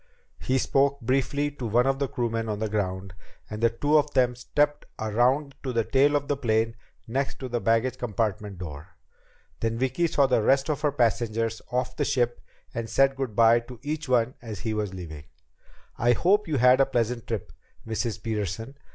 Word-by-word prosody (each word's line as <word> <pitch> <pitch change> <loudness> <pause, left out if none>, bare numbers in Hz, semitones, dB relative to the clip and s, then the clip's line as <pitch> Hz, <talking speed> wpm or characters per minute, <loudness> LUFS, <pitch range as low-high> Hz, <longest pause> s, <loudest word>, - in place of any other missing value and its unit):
He 130 - 0
spoke 140 +2 +2
briefly 135 +4 0
to 130 -4 -5
one 120 +3 +3
of 135 0 +1
the 140 - 0
crewmen 115 -2 -2
on 105 - -2
the 110 +1 -1
ground, 95 -3 -3 0.4
and 105 +1 -5
the 115 - +5
two 145 +7 +3
of 150 0 -1
them 125 -2 +3
stepped 145 +4 0
around 125 +6 +1
to 130 - -3
the 115 -2 +1
tail 140 +5 +3
of 145 -1 0
the 145 - +1
plane, 115 -3 0 0.3
next 135 +4 -2
to 130 - -5
the 120 -1 -2
baggage 120 +3 +1
compartment 105 -3 -2
door. 80 -3 -9 0.6
Then 115 0 -1
Vicki 130 +7 +1
saw 140 -3 +3
the 125 -4 +2
rest 135 +6 +3
of 150 -1 -3
her 150 -2 +2
passengers 115 -3 0
off 125 0 -1
the - - 0
ship 120 -2 0 0.3
and 115 -1 -4
said 135 +4 +3
good 130 -6 -4
by 115 +1 +6
to 120 +1 -11
each 150 -1 -4
one 125 0 +2
as 110 -4 -7
he 110 -2 -2
was 105 -2 -2
leaving. 80 -6 -8 0.7
"I 120 +1 +4
hope 200 - +2
you 155 -3 0
had 125 +2 +6
a 135 - +4
pleasant 120 0 -1
trip, 110 -5 -4 0.3
Mrs. 115 0 -3
Peterson. 110 +4 -4
120 Hz, 195 wpm, -26 LUFS, 110-135 Hz, 0.7 s, by